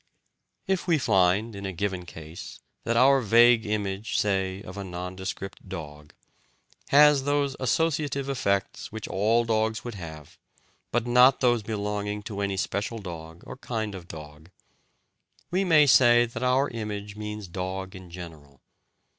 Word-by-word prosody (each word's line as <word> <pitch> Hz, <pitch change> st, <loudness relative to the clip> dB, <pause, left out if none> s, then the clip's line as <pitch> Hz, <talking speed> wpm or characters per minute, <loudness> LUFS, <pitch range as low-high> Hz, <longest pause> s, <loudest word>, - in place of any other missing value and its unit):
If 190 Hz, -2 st, -1 dB
we 170 Hz, -2 st, +4 dB
find, 100 Hz, -2 st, +2 dB
in 100 Hz, -, -7 dB
a -, -, -3 dB
given 95 Hz, -1 st, -3 dB
case, 80 Hz, 0 st, -10 dB, 0.3 s
that 115 Hz, 0 st, +1 dB
our 135 Hz, +2 st, +5 dB
vague 115 Hz, 0 st, +5 dB
image, 105 Hz, 0 st, -2 dB
say, 95 Hz, -1 st, 0 dB
of 95 Hz, -, -9 dB
a 100 Hz, -, -5 dB
nondescript 95 Hz, +1 st, -6 dB
dog, 75 Hz, -1 st, -8 dB, 0.7 s
has 145 Hz, -1 st, +6 dB
those 145 Hz, -1 st, +1 dB
associative 145 Hz, 0 st, 0 dB
effects 100 Hz, -7 st, -1 dB
which 110 Hz, 0 st, -6 dB
all 115 Hz, +4 st, +2 dB
dogs 110 Hz, -1 st, 0 dB
would 120 Hz, -, -6 dB
have, 80 Hz, -6 st, -10 dB, 0.5 s
but 120 Hz, 0 st, 0 dB
not 125 Hz, +2 st, +5 dB
those 120 Hz, -3 st, +3 dB
belonging 105 Hz, -1 st, -3 dB
to 100 Hz, -2 st, -5 dB
any 100 Hz, -1 st, -1 dB
special 100 Hz, +4 st, -2 dB
dog 85 Hz, -4 st, -9 dB
or -, -, -9 dB
kind 110 Hz, -5 st, -4 dB
of 90 Hz, -3 st, -9 dB
dog, 75 Hz, -2 st, -11 dB, 1.0 s
we 185 Hz, +2 st, +1 dB
may 160 Hz, -5 st, +5 dB
say 120 Hz, -3 st, +6 dB
that 115 Hz, -, -7 dB
our 130 Hz, +2 st, +2 dB
image 105 Hz, -3 st, -5 dB
means 105 Hz, -1 st, -6 dB
"dog" 95 Hz, +1 st, -5 dB
in 95 Hz, -1 st, -11 dB
general. 80 Hz, -6 st, -11 dB
105 Hz, 145 wpm, -26 LUFS, 95-120 Hz, 1.0 s, has